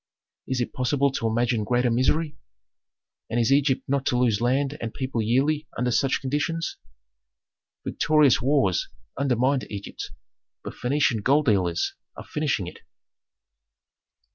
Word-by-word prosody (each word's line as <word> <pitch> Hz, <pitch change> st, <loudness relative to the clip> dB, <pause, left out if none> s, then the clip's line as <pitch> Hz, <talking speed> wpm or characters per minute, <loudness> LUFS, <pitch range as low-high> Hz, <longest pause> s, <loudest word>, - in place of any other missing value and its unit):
Is 130 Hz, -1 st, -1 dB
it 120 Hz, -, -3 dB
possible 140 Hz, +2 st, +1 dB
to 130 Hz, -4 st, -2 dB
imagine 115 Hz, 0 st, +1 dB
greater 125 Hz, +2 st, +1 dB
misery? 145 Hz, +6 st, +1 dB, 0.9 s
And 120 Hz, -, 0 dB
is 115 Hz, +2 st, +2 dB
Egypt 140 Hz, -1 st, +3 dB
not 140 Hz, 0 st, 0 dB
to 125 Hz, -, +2 dB
lose 115 Hz, -4 st, +2 dB
land 135 Hz, +4 st, +1 dB
and 115 Hz, -, -3 dB
people 130 Hz, -3 st, -2 dB
yearly 140 Hz, +7 st, +1 dB
under 125 Hz, +1 st, 0 dB
such 135 Hz, +3 st, +1 dB
conditions? 150 Hz, +5 st, -2 dB, 1.1 s
Victorious 150 Hz, -3 st, +3 dB
wars 125 Hz, -, +1 dB, 0.3 s
undermined 130 Hz, 0 st, +1 dB
Egypt, 100 Hz, -1 st, -6 dB, 0.5 s
but -, -, -6 dB
Phœnician 125 Hz, -3 st, +1 dB
gold 140 Hz, +7 st, +3 dB
dealers 90 Hz, -7 st, +1 dB, 0.2 s
are -, -, -8 dB
finishing 145 Hz, -, -1 dB
it." 90 Hz, -, -9 dB
130 Hz, 130 wpm, -25 LUFS, 115-140 Hz, 1.1 s, Egypt